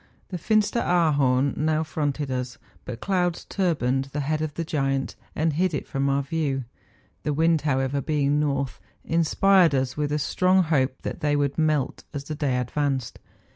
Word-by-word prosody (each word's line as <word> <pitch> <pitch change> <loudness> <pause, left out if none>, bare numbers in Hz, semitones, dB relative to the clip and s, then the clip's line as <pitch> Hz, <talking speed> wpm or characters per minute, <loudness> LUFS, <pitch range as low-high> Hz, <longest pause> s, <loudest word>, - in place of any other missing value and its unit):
The 180 - -4
Finsteraar 205 -5 +2
horn 135 -1 +2
now 155 0 +1
fronted 145 -3 -2
us; 125 -1 -3 0.3
but 120 -2 -7
clouds 180 -3 0
turbaned 135 -9 0
the 140 +2 -4
head 155 +2 -1
of 155 -2 -3
the 170 - -2
giant, 135 -4 -1 0.2
and 155 0 +1
hid 175 +1 +1
it - - -3
from 135 0 -1
our 140 0 +1
view. 140 -2 -1 0.6
The 150 - -1
wind, 160 +1 +3
however, 135 -1 0
being 145 0 +1
north, 140 -3 -1 0.3
inspired 170 0 +4
us 130 -1 -1
with 150 -1 -1
a 150 - +1
strong 185 +5 +2
hope 135 -5 0
that - - -4
they 145 -1 +1
would 140 -1 0
melt 155 -4 0
as 140 - -3
the 155 - -5
day 145 -4 0
advanced. 130 0 -2
145 Hz, 175 wpm, -25 LUFS, 135-160 Hz, 0.6 s, inspired